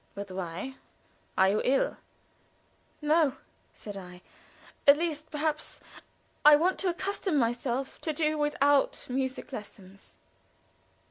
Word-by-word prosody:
"But 200 -1 -6
why? 185 +8 -5 0.6
Are 190 0 +5
you 210 +2 +1
ill?" 270 +1 +1 1.1
"No," 300 -3 +3 0.3
said 205 -2 -9
I. 180 -2 -10 0.6
"At 280 +1 +9
least 315 -2 -3
perhaps 310 0 -2 0.6
I 300 0 +9
want 350 +5 +1
to 385 - +1
accustom 380 -1 -1
myself 245 +2 -1
to 320 - -1
do 310 0 0
without 290 -1 +2
music 260 +1 -3
lessons." 200 -4 -10
275 Hz, 115 wpm, -29 LUFS, 210-305 Hz, 1.1 s, At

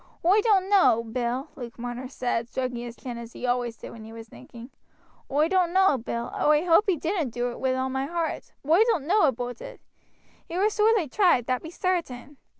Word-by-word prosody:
"Oi 395 +5 +5
doan't 400 -4 +3
know, 255 - +4
Bill," 240 +3 -3
Luke 240 -3 -9
Marner 245 +1 -5
said, 245 -3 -3
stroking 255 -1 -3
his 240 0 -7
chin 240 -2 -7
as 235 0 -10
he - - -6
always 245 -2 -1
did - - -10
when 225 -1 -11
he 220 - -11
was 225 0 -10
thinking; 230 - -13 0.6
"oi 295 +3 +2
doan't 360 -1 +1
know, 380 -5 +4
Bill 235 +1 -5
oi 300 +1 +4
hoape 355 +5 +5
he 360 - +2
didn't 325 -2 -1
do 245 +1 -2
it, - - -9
wi' 260 -1 0
all 260 0 -1
my 265 +1 -2
heart. 335 0 -3
But 290 - -3
oi - - +7
doan't 360 - 0
know 390 +1 +4
aboot 245 -1 -3
it. - - -9 0.7
He 340 - -4
war 415 +3 +2
sorely 425 -4 +2
tried 340 - +3
that 255 0 -1
be 320 - -8
sartain. 295 -7 -3
265 Hz, 215 wpm, -26 LUFS, 240-355 Hz, 0.7 s, oi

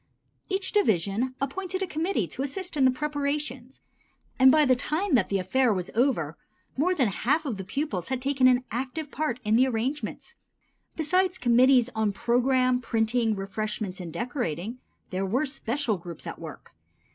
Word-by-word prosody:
Each 385 0 -1
division 225 - +1
appointed 375 +7 -2
a - - +1
committee 330 - -1
to 260 - -5
assist 355 +6 -3
in 275 -3 +3
the - - +7
preparations, 280 -2 -3 0.6
and 260 0 +8
by 305 +1 +5
the 255 -1 +4
time 310 +8 -1
that 250 - +3
the 200 - +1
affair 235 +7 +2
was 185 -3 -2
over 220 - +1 0.4
more 355 +7 +2
than 265 -8 +2
half 285 - 0
of 245 -8 -2
the 190 - -5
pupils 195 - -3
had 260 -1 -2
taken 265 0 +3
an 250 0 +4
active 270 +5 -4
part 270 -5 -2
in 215 +1 +3
the 260 +2 +5
arrangements. 260 - -3 0.6
Besides 365 +4 +1
committees 250 0 +4
on 220 -2 0
program, 255 +3 +2
printing, 225 -1 +1
refreshments 200 0 -4
and 175 -3 -6
decorating, 225 - -3 0.3
there 185 +1 -1
were 240 +10 +1
special 265 -4 -2
groups 170 -1 -9
at - - -6
work. - - -10
255 Hz, 165 wpm, -27 LUFS, 220-290 Hz, 0.6 s, and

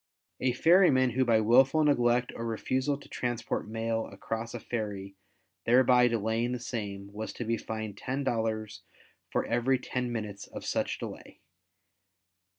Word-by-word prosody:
A 125 -1 +1
ferryman 145 -4 +5
who 130 +3 +2
by 115 -3 +4
wilful 130 +7 +5
neglect 125 -4 +2
or 115 - -5
refusal 130 +5 -1
to 145 - -15
transport 120 -3 -3
mail 115 0 -2
across 115 +3 -5
a - - -4
ferry 100 -4 -4 0.5
thereby 125 0 +6
delaying 115 +1 0
the 125 - -3
same, 100 -4 -5
was 110 +1 -5
to 120 - -5
be 115 +1 +1
fined 110 -2 -5
$10 110 -5 -2 0.5
for - - 0
every 125 +3 +2
ten 125 -1 -3
minutes 105 -4 -5
of - - -8
such - - -1
delay. - - -9
115 Hz, 145 wpm, -29 LUFS, 110-125 Hz, 0.5 s, thereby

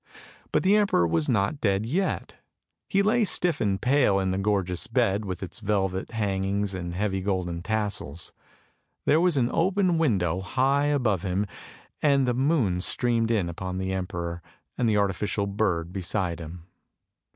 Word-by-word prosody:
But - - +1
the 195 +3 +4
emperor 200 - +3
was 80 -2 0
not 115 +7 0
dead 100 0 +1
yet. 180 +11 -2 0.5
He 195 +1 +3
lay 225 +3 +3
stiff 175 -5 +1
and 100 -3 +1
pale 125 -4 +3
in 95 -1 0
the 95 - -1
gorgeous 95 -3 0
bed 100 +2 +1
with 95 -1 -5
its 95 - -5
velvet 95 -3 -1
hangings 100 -2 -1
and 90 -2 -5
heavy 95 0 -1
golden 90 -3 -2
tassels. 100 -6 -3 0.7
There 155 +3 +4
was 175 -4 +2
an 125 -2 +2
open 185 -1 +2
window 95 - +1
high 135 +8 +1
above 120 - +1
him, 95 +1 -1 0.6
and 140 -3 +3
the 125 - +2
moon 125 - +1
streamed 115 +2 +1
in 105 -7 +1
upon 90 +2 -5
the 95 0 -2
emperor, 85 -2 -4 0.3
and 120 -2 +1
the 105 - +2
artificial 100 +1 0
bird 95 -4 -1
beside 90 -2 -2
him. 85 +1 -9
100 Hz, 160 wpm, -26 LUFS, 95-125 Hz, 0.7 s, the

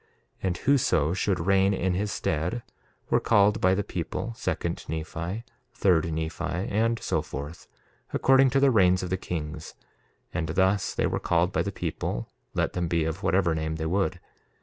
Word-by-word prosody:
And 90 -2 -1
whoso 90 - +2
should 95 0 0
reign 95 +1 +4
in 95 0 0
his 100 +3 -1
stead 90 +9 -1 0.5
were - - +5
called 105 +2 +3
by 95 0 +4
the 100 - 0
people, 90 +4 -4
second - - -2
Nephi, 85 +6 -4 0.3
third 85 -6 +2
Nephi, 80 +2 -3
and 100 +6 0
so - - 0
forth, 75 +4 -7 0.4
according 135 0 +5
to 135 +2 +2
the 135 -1 +5
reigns 95 -4 +4
of 90 - -4
the 95 - +1
kings; 80 -3 -5 0.6
and 80 -2 -2
thus 95 +3 +1
they - - +1
were - - 0
called - - +1
by - - +1
the - - -2
people, - - -3 0.3
let - - 0
them 90 -1 -1
be 85 -1 +1
of 80 +3 -3
whatever 95 -4 +2
name 80 0 -2
they 80 0 -3
would. 90 +1 0
90 Hz, 170 wpm, -27 LUFS, 80-100 Hz, 0.6 s, were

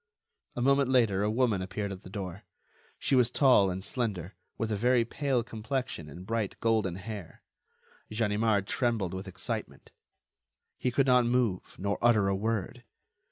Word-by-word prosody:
A 120 - -1
moment 140 0 +3
later 115 -7 +3
a 105 - +1
woman 110 -4 +1
appeared 100 +2 -3
at 95 -1 -7
the - - -11
door; 95 -1 -6 0.6
she - - -1
was 125 -3 +5
tall 125 -7 +5
and 95 +1 -4
slender, 100 -7 -3 0.2
with 115 -1 -2
a - - +1
very 120 +2 +3
pale 135 -1 0
complexion 110 - -4
and 85 +6 -10
bright 110 -1 -2
golden 110 -6 +1
hair. 100 -3 -8 0.7
Ganimard 105 -1 +1
trembled 115 -7 0
with 95 +1 -5
excitement; 95 - -5 0.9
he 125 - +1
could 130 +2 +2
not 125 -2 +4
move, 120 -7 0
nor 100 +1 -2
utter 110 -4 +4
a 95 - +1
word. 105 -1 -2
110 Hz, 160 wpm, -29 LUFS, 95-120 Hz, 0.9 s, was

